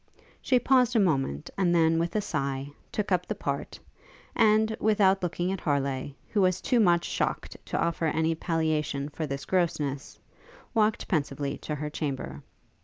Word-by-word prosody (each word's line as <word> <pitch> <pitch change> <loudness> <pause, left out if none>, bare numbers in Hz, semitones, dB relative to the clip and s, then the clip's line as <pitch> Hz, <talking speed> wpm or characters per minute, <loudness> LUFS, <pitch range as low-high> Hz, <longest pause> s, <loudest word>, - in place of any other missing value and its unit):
She 255 - +3
paused 250 -1 +3
a - - +5
moment, 135 - 0
and 175 -2 +3
then, 165 -1 +4
with 170 +3 -2
a 215 - +2
sigh, 140 -6 -3 0.2
took 210 -2 -2
up 180 -1 +1
the - - -2
part, - - -4 0.6
and, 220 0 +4
without 200 -3 +3
looking 175 +1 -1
at 195 - -4
Harleigh, 140 -2 -1 0.2
who 210 - +1
was 185 -1 +2
too 245 - +1
much 175 -5 +4
shocked - - -2
to - - -2
offer 170 -1 0
any 160 +1 +1
palliation 155 -4 -1
for 155 +1 -4
this 140 0 -5
grossness, 150 -6 -1 0.6
walked 215 -2 +1
pensively 140 -4 -1
to 150 - -4
her 150 +1 -4
chamber. 130 - -4
165 Hz, 165 wpm, -28 LUFS, 145-195 Hz, 0.6 s, a